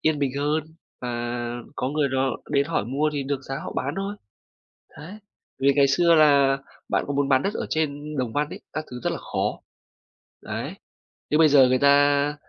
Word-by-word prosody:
yên 155 Hz, -1 st, +1 dB
bình 140 Hz, -2 st, 0 dB
hơn 150 Hz, +2 st, 0 dB, 0.4 s
và 125 Hz, -, -4 dB, 0.7 s
có 130 Hz, -, -1 dB
người 150 Hz, 0 st, 0 dB
đó 130 Hz, 0 st, 0 dB
đến 140 Hz, -1 st, +2 dB
hỏi 165 Hz, -10 st, -1 dB
mua 140 Hz, +6 st, 0 dB
thì 145 Hz, -2 st, -2 dB
được 135 Hz, 0 st, -3 dB
giá 135 Hz, 0 st, -5 dB
họ -, -, -5 dB
bán 140 Hz, +4 st, -2 dB
thôi. 195 Hz, +1 st, -3 dB, 0.8 s
Đấy, 160 Hz, +6 st, -9 dB, 0.5 s
vì 140 Hz, +1 st, +4 dB
ngày 140 Hz, -1 st, +5 dB
xưa 170 Hz, +4 st, +4 dB
là 140 Hz, -3 st, +5 dB, 0.3 s
bạn -, -, +1 dB
có 145 Hz, -, -2 dB
muốn 140 Hz, 0 st, 0 dB
bán 130 Hz, -1 st, +4 dB
đất 200 Hz, -, -1 dB
ở -, -, -3 dB
trên 150 Hz, -1 st, -2 dB
Đồng 125 Hz, -3 st, -2 dB
Văn 145 Hz, 0 st, 0 dB
ấy, -, -, -8 dB
các 155 Hz, 0 st, -3 dB
thứ 125 Hz, -, -6 dB
rất -, -, +1 dB
là -, -, -4 dB
khó. -, -, -3 dB, 0.8 s
Đấy. -, -, -5 dB, 0.6 s
Nhưng 150 Hz, -, +3 dB
bây 155 Hz, -2 st, +6 dB
giờ 135 Hz, -3 st, +7 dB
người 130 Hz, 0 st, +2 dB
ta 145 Hz, +1 st, +4 dB
145 Hz, 200 wpm, -24 LUFS, 135-150 Hz, 0.8 s, giờ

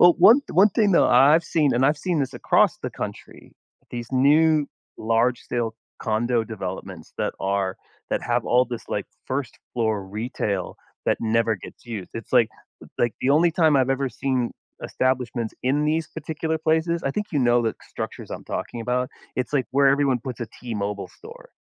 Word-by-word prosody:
Well, 175 Hz, -1 st, +8 dB
one 220 Hz, +10 st, +8 dB
one 200 Hz, +3 st, +6 dB
thing, 205 Hz, 0 st, +2 dB
though, 170 Hz, -, +5 dB
I've 145 Hz, +7 st, +6 dB
seen, 150 Hz, -4 st, +2 dB
and 125 Hz, -, +3 dB
I've 145 Hz, 0 st, +2 dB
seen 180 Hz, -4 st, -1 dB
this 135 Hz, -, -2 dB
across -, -, +3 dB
the -, -, -5 dB
country, -, -, -8 dB, 0.4 s
these 120 Hz, 0 st, -6 dB
new 150 Hz, +3 st, +4 dB, 0.3 s
large-scale 115 Hz, 0 st, 0 dB, 0.3 s
condo 115 Hz, +1 st, 0 dB
developments 95 Hz, -5 st, -7 dB
that -, -, -1 dB
are 95 Hz, -1 st, -1 dB, 0.3 s
that -, -, 0 dB
have 120 Hz, 0 st, 0 dB
all 125 Hz, +1 st, +4 dB
this, 120 Hz, -2 st, -7 dB
like, -, -, -2 dB, 0.2 s
first 130 Hz, -2 st, -3 dB, 0.2 s
floor 110 Hz, -4 st, 0 dB
retail 100 Hz, -2 st, -3 dB, 0.3 s
that -, -, +2 dB
never 115 Hz, 0 st, +2 dB
gets 95 Hz, -, -13 dB
used. 110 Hz, -6 st, -6 dB
It's 115 Hz, -, -8 dB
like 115 Hz, -, +5 dB, 0.5 s
like, 120 Hz, -2 st, +2 dB
the 130 Hz, -, +1 dB
only 165 Hz, +4 st, +5 dB
time 160 Hz, -3 st, +3 dB
I've 130 Hz, -1 st, +2 dB
ever 135 Hz, 0 st, 0 dB
seen 130 Hz, -2 st, -1 dB, 0.3 s
establishments 125 Hz, -3 st, -1 dB
in 140 Hz, +4 st, +2 dB
these 155 Hz, +1 st, 0 dB
particular 160 Hz, 0 st, -3 dB
places, 160 Hz, +2 st, +1 dB
I 135 Hz, -, 0 dB
think 210 Hz, +8 st, -2 dB
you 150 Hz, -, +1 dB
know 120 Hz, -1 st, +4 dB
the 110 Hz, -, -1 dB, 0.2 s
structures -, -, -6 dB
I'm -, -, -6 dB
talking 120 Hz, -, -4 dB
about- 125 Hz, +3 st, -1 dB, 0.3 s
it's 130 Hz, +2 st, -2 dB
like 135 Hz, -4 st, +1 dB
where 140 Hz, +1 st, +5 dB
everyone 135 Hz, -2 st, +2 dB
puts 125 Hz, 0 st, -6 dB
a 120 Hz, -, -2 dB
T-Mobile 105 Hz, -4 st, -4 dB
store, -, -, -14 dB
130 Hz, 175 wpm, -24 LUFS, 115-155 Hz, 0.5 s, Well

